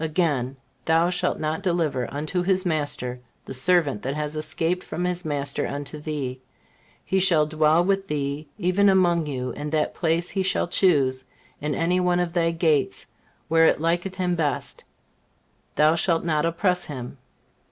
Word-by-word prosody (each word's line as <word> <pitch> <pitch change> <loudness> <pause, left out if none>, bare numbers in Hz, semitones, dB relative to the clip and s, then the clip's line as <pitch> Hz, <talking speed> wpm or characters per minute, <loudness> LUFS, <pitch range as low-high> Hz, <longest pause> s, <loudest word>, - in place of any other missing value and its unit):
Again: 150 -6 0 0.3
"Thou 165 +2 +3
shalt 180 - 0
not 155 +3 -2
deliver 165 -9 -1
unto 155 +6 -2
his 190 +1 +1
master 145 -6 -1 0.3
the - - -7
servant 140 - +2
that 135 +2 -3
has 150 0 -3
escaped 165 +3 -1
from 175 - -4
his 180 0 -1
master 145 -2 -2
unto 145 +1 -5
thee; 140 -4 -4 0.6
he 190 - +1
shall 170 -5 +4
dwell 155 +2 +3
with 195 0 0
thee, 145 0 -3
even 200 +1 +3
among 175 -4 +3
you, 130 -3 -3
in 145 +4 -5
that 155 0 0
place 170 0 0
he 195 - -1
shall 190 -2 +1
choose 140 -8 +2 0.4
in 165 +4 0
one 180 0 +2
of 175 -1 -1
thy 170 -1 +2
gates 165 -4 0 0.4
where 165 0 +5
it - - +2
liketh 175 +4 -1
him 180 -1 0
best; 150 -6 -2 0.9
thou 155 +1 +5
shalt 165 0 +1
not 155 -1 +1
oppress 180 +2 0
him." 130 -2 -7
160 Hz, 160 wpm, -24 LUFS, 145-180 Hz, 0.9 s, where